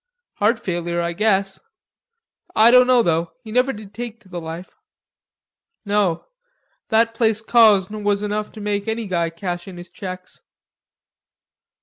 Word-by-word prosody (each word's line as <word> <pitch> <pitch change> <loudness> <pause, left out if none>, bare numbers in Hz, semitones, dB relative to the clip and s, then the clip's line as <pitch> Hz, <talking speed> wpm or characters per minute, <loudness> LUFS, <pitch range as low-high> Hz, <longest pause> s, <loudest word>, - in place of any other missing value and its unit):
"Heart 220 +3 +2
failure, 175 -1 -3
I 170 0 -1
guess. 195 0 0 0.9
I 220 +2 +6
dunno, 250 -1 +6
though, 170 -2 0
he 220 - -9
never 250 +3 +2
did 210 -4 -11
take 230 +1 -7
to 195 - -21
the 175 -1 -6
life." 165 +3 -8 1.1
"No. 200 -5 0 0.6
That 225 0 +3
place 225 -2 +2
Cosne 215 -3 +3
was 205 0 +1
enough 210 0 -3
to 215 - -9
make 205 0 -2
any 225 0 -2
guy 170 -4 -1
cash 175 +1 -5
in 185 -2 -9
his 175 0 -11
checks." 185 -1 -8
205 Hz, 140 wpm, -21 LUFS, 175-220 Hz, 1.1 s, I